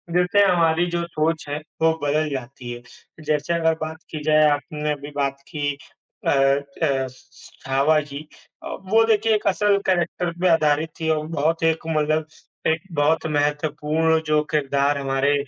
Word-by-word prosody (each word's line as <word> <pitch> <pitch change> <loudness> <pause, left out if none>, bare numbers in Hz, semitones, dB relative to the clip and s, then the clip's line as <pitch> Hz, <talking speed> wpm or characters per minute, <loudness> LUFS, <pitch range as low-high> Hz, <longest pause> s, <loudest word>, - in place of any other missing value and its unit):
जिससे 180 +3 +4
हमारी 170 -2 +3
जो 170 0 -1
सोच 160 -1 -1
है, 145 - -2 0.2
वो 160 0 +4
बदल 150 +2 +1
जाती 130 -2 -6
है, 120 0 -7 0.4
जैसे 150 +2 0
अगर 165 -1 +2
बात 155 0 -4
की 155 -2 -5
जाए 155 0 +5
आपने 150 +1 -2
अभी 145 0 -8
बात 140 -1 -1
की 145 -3 -3 0.5
अ - - +4
अ, 140 0 +1
स 130 +1 -16 0.2
छावा 140 +4 +3
की 145 +1 -9 0.4
अ, - - -6 0.2
वो 225 +1 +6
देखिए 225 0 +2
एक 210 - -2
असल 200 +1 +3
कैरेक्टर 175 -1 0
पे 185 - +3
आधारित 155 -1 +2
थी 160 -1 -1
और 155 -1 0
बहुत 165 +1 0
एक 160 0 +2
मतलब 155 0 0 0.4
एक 160 0 +1 0.2
बहुत 155 +3 +2
महत्वपूर्ण 150 +2 +1
जो 150 0 +3
किरदार 140 -1 +1
हमारे 135 +1 +1
155 Hz, 165 wpm, -22 LUFS, 145-165 Hz, 0.5 s, वो